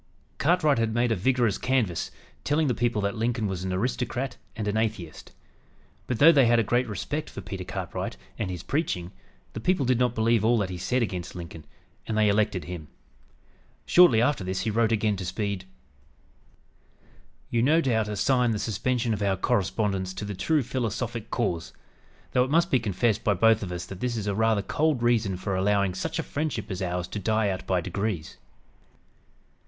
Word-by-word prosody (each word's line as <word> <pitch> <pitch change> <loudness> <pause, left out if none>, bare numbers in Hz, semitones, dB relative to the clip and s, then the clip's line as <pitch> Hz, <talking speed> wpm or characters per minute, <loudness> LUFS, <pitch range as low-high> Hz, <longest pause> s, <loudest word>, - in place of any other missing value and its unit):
Cartwright 155 -4 +3
had 115 -1 0
made 120 0 +2
a - - +3
vigorous 120 +1 +1
canvass, 125 -10 0 0.3
telling 150 +2 +1
the 130 - +2
people 115 -3 0
that 100 - 0
Lincoln 115 0 -1
was 95 -2 -3
"an 95 - -2
aristocrat 125 +5 -2 0.2
and 110 -2 -3
an 105 - 0
atheist." 110 -7 -3 0.8
But, 125 - -1
though 155 +6 +8
they 135 -6 +5
had 120 0 +4
a 115 - +3
great 120 +4 +1
respect 115 - -4
for - - -8
Peter 95 -3 -6
Cartwright 90 0 -5 0.2
and - - -2
his 90 -2 -5
preaching, 90 - -2 0.4
the - - -5
people 160 +3 +1
did 125 -1 +2
not 125 -1 +1
believe 115 -1 +2
all 120 +2 +4
that 100 -4 -1
he 90 - -5
said 125 +7 +1
against 90 -5 -4
Lincoln, 85 -3 -8 0.4
and 110 - -1
they 105 -1 +4
elected 100 -3 +1
him. 85 -4 -7 1.0
Shortly 130 -11 +6
after 135 -5 +1
this 95 0 -2
he 110 - -1
wrote 115 +1 +2
again 105 -2 +1
to 95 - -5
Speed: 95 0 -3 1.9
"You, 115 - +2
no 150 +7 +4
doubt, 115 -8 +1
assign 120 +4 +2
the 110 - 0
suspension 115 +2 -1
of 105 - -3
our 100 -1 +2
correspondence 95 0 0
to 105 - -4
the 105 - -4
true 130 - +1
philosophic 115 -2 -3
cause; 85 -9 -2 0.6
though 125 - +3
it 130 - -3
must 165 +4 +2
be 130 - +4
confessed 110 +1 0
by 105 - +2
both 115 +3 +4
of 95 -3 -5
us 90 -1 -4
that 95 0 -9
this 120 0 -2
is 105 - -3
a 100 - 0
rather 110 -1 +2
cold 150 +2 0
reason 115 -6 +2
for 95 +1 -3
allowing 100 0 +2
such 95 - -3
a 160 - -1
friendship 140 -10 -3
as 95 - -4
ours 90 -1 -2
to 105 - -4
die 110 +1 +1
out 95 0 -4
by 95 -1 +2
degrees. 95 0 -3
110 Hz, 190 wpm, -26 LUFS, 95-120 Hz, 1.9 s, though